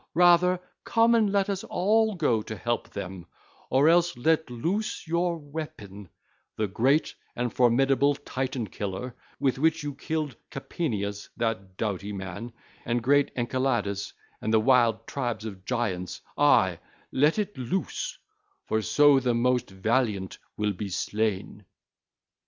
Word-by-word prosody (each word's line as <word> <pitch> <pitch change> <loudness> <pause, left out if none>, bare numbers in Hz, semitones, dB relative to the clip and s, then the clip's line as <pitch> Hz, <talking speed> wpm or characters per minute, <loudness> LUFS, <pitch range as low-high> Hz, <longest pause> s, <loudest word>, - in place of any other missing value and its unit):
Rather, 180 +1 +5 0.2
come 230 +1 +3
and 220 -3 +3
let 200 -1 +2
us 195 -2 -2
all 215 +3 +2
go 125 -10 +1
to 110 - -6
help 120 +2 -2
them, 95 -3 -7 0.4
or 135 +4 +4
else 175 -1 +4
let 160 +4 +2
loose 170 - -2
your 170 +1 0
weapon, 140 - -8 0.5
the 110 - 0
great 130 - +2 0.2
and 120 0 -2
formidable 135 +3 +3
Titan 130 -3 -3
killer 100 +4 -5 0.2
with 135 -2 +1
which 160 +1 +2
you 145 -1 -3
killed 150 -1 -3
Capaneus, 105 -9 -3
that 100 -5 -2
doughty 105 -2 -2
man, 95 +4 -6 0.3
and 120 0 -1
great 145 +3 +4
Enceladus 120 -5 -1 0.3
and 110 - -1
the 110 - +5
wild 120 -1 +3
tribes 120 -5 -3
of 95 -3 -8
Giants; 100 -7 -2 0.2
ay, 95 - +4 0.3
let 150 +7 +3
it 210 -1 -2
loose, 190 - -3 0.5
for 110 - 0
so 145 +4 +5
the 125 -2 0
most 125 +1 +1
valiant 100 0 -1 0.2
will 105 -1 0
be 100 +2 -5
slain. 105 +1 -2
125 Hz, 135 wpm, -27 LUFS, 105-155 Hz, 0.5 s, Rather